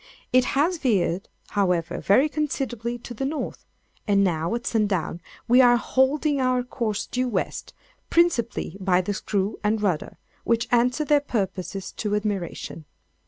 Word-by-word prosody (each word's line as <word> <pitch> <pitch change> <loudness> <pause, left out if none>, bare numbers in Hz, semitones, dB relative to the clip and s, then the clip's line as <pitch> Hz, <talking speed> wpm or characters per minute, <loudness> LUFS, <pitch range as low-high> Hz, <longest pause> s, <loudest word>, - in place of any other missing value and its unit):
It 255 0 +5
has 330 +4 +2
veered, 195 - 0 0.2
however, 180 -5 0
very 255 +10 +4
considerably 255 -6 -2
to 240 +1 -9
the 240 - -4
north; 290 +3 -4 0.4
and 200 -1 +4
now, 170 +1 0
at 235 - -5
sundown, 195 -6 0 0.3
we 245 +2 +6
are 245 -1 +6
holding 275 +3 +1
our 255 -1 +2
course 230 -4 -2
due 255 +1 -1
west, 200 -5 -3 0.3
principally 290 - +1
by 185 -1 +2
the 205 +3 -2
screw 200 +1 -2
and 215 +1 +1
rudder, 185 -7 -1 0.3
which 230 0 +1
answer 250 +5 +2
their 295 -1 +4
purposes 195 -6 -3
to 210 -1 -1
admiration. 200 -6 -3
230 Hz, 145 wpm, -24 LUFS, 195-255 Hz, 0.4 s, we